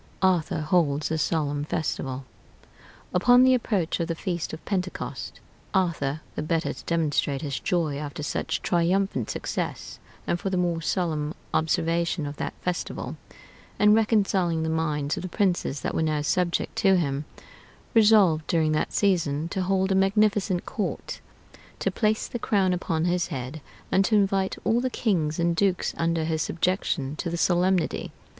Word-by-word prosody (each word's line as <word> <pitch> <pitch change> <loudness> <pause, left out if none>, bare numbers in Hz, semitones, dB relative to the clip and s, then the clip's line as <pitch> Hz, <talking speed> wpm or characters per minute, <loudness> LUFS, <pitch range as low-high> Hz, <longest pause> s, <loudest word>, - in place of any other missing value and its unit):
ARTHUR 175 -4 +2
HOLDS 150 -3 +1
A 160 - +1
SOLEMN 145 -2 0
FESTIVAL 135 -4 -3 0.9
Upon 245 +7 +6
the 260 0 +6
approach 205 -10 0
of 170 - -1
the 165 - -2
feast 175 -1 -3
of 160 - -9
Pentecost, 185 -3 -4 0.4
Arthur, 155 -6 0
the - - -3
better 165 +2 -1
to - - -12
demonstrate 150 -4 0
his 140 -2 -3
joy 160 -5 0
after 150 0 -5
such - - -2
triumphant 175 - +1
success, - - -4 0.3
and 175 - 0
for 195 - -2
the 190 - -1
more 175 -2 0
solemn 160 -3 -1 0.2
observation 165 +1 +1
of 145 0 -6
that - - -4
festival, 180 -1 -3 0.6
and 210 0 +6
reconciling 195 -7 +2
the 160 - -1
minds 150 -3 -1
of - - -3
the 185 - -5
princes 175 -7 0
that - - -2
were - - 0
now 155 -2 0
subject 175 +2 0
to 195 -4 +4
him, 145 -3 -1 0.7
resolved, 205 -8 +5
during 160 -2 +2
that 155 - 0
season, 165 -6 +1
to 190 +1 -2
hold 190 +1 +1
a - - +4
magnificent 195 -1 +2
court, 210 - -4 0.6
to - - -1
place 215 -1 0
the 240 - -5
crown 195 -4 +2
upon 165 -2 -1
his 175 -1 +1
head, 130 +4 -5 0.3
and 190 - +4
to 215 - +2
invite 195 -2 +2
all 235 +2 +2
the 255 - 0
kings 170 -11 0
and 170 0 +1
dukes 185 0 +1
under 165 -1 0
his 160 0 -1
subjection 165 -5 -1
to 170 - -3
the 170 - -3
solemnity. 180 0 +1
170 Hz, 160 wpm, -26 LUFS, 155-190 Hz, 0.9 s, Upon